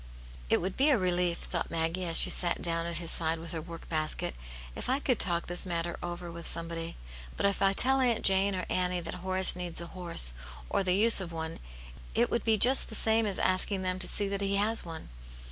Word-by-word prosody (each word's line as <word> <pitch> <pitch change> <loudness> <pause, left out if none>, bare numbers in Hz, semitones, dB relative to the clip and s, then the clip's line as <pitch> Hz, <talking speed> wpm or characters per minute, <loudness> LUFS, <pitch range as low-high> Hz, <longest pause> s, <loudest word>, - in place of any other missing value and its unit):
" - - -17
It - - +2
would 185 +2 -4
be 280 +3 +3
a 275 - +4
relief," 180 -2 0
thought 170 - -5
Maggie, 165 +2 -2
as 165 -1 -1
she - - +7
sat 175 -2 +3
down 165 0 -1
at 170 -1 -3
his 170 -1 -3
side 165 0 0
with 165 +1 -9
her 165 -2 -5
work 165 +1 -11
basket, 155 - -1 0.2
" - - -14
if - - -6
I 260 - +2
could 255 -5 -1
talk 170 -2 +1
this 175 +2 -2
matter 170 -1 -3
over 175 0 -6
with 170 0 -6
somebody. 165 0 -4 0.4
But - - -1
if 200 0 0
I 195 0 +3
tell 265 +6 +6
Aunt 240 -3 0
Jane 195 +1 +3
or 185 - -3
Annie 180 -1 -1
that 165 - -7
Horace 185 0 0
needs 175 -2 -2
a 170 - -6
horse, 170 - +3 0.4
or - - +1
the 180 -1 +2
use 220 0 +4
of 175 -2 -7
one, 160 0 -6 0.6
it - - +1
would 235 - -1
be 220 -1 +2
just 255 +6 +4
the 220 - -3
same 220 0 +3
as 195 - 0
asking 185 +1 0
them 185 0 -2
to - - 0
see 205 - -2
that 200 0 -3
he 200 0 0
has 215 +3 +1
one. 165 - -9
180 Hz, 240 wpm, -29 LUFS, 165-200 Hz, 0.6 s, she